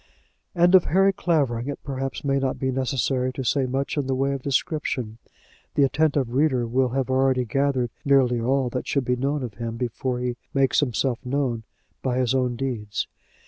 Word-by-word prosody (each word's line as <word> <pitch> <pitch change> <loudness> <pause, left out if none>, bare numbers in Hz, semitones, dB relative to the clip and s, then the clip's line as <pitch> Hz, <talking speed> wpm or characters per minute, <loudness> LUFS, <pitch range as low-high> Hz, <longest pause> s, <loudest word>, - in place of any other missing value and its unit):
And 175 +1 +4
of 185 -2 +7
Harry 195 +3 +3
Clavering 140 -10 0
it 145 - -5
perhaps 135 -1 -4
may 140 -1 +1
not 135 -1 -1
be 130 0 -1
necessary 130 0 0
to 130 - -4
say 130 +1 +1
much 135 +4 -2
in 140 -2 0
the 135 - 0
way 135 +1 +1
of 135 - -4
description. 130 -5 -2 0.6
The 145 - +4
attentive 140 -3 +1
reader 130 -3 +2
will 125 +2 +1
have 130 +1 -1
already 130 -1 +2
gathered 130 -1 0
nearly 130 -4 +3
all 130 +1 +1
that 125 - -4
should 140 -3 0
be 125 - +1
known 140 +3 -1
of 120 -4 -5
him 115 -1 -4
before 125 +1 -2
he 125 0 -2 0.2
makes 135 -2 +3
himself 125 -1 0
known 125 -4 -1 0.4
by 125 -1 -1
his 130 -1 +1
own 125 -2 +1
deeds. 115 -5 -3
130 Hz, 185 wpm, -24 LUFS, 125-140 Hz, 0.6 s, of